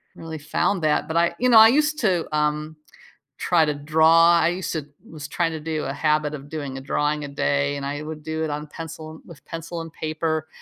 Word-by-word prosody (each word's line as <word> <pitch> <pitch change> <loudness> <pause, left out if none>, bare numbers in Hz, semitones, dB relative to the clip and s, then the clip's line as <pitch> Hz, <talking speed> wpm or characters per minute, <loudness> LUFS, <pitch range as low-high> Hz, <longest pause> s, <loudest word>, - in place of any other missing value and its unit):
really 160 -1 -7
found 175 +5 0
that, 155 -1 +1
but 160 - -4
I 170 0 +2
You 250 - +2
know, 230 -2 +8
I 220 - +10
used 300 +5 +2
to, 185 - +1
um, 150 +1 -1 0.6
try 170 -3 +3
to 150 - 0
draw. 160 +3 +5
I - - +3
used 180 +1 -3
to 155 -4 -3 0.2
was 150 -3 -8
trying 165 +3 -1
to 160 - -5
do 155 0 -3
a 135 - -3
habit 150 +1 0
of 145 -1 -8
doing 145 -4 -5
a - - -6
drawing 150 +2 -1
a - - -5
day, 140 0 0
and 140 - -5
I 145 +1 -4
would 155 0 -7
do 160 +1 -3
it 160 - -2
on 150 +1 -4
pencil 160 0 -9
with 170 -4 -14
pencil 165 +1 -6
and 165 -1 -9
paper, 155 0 -2
155 Hz, 225 wpm, -23 LUFS, 150-165 Hz, 0.6 s, I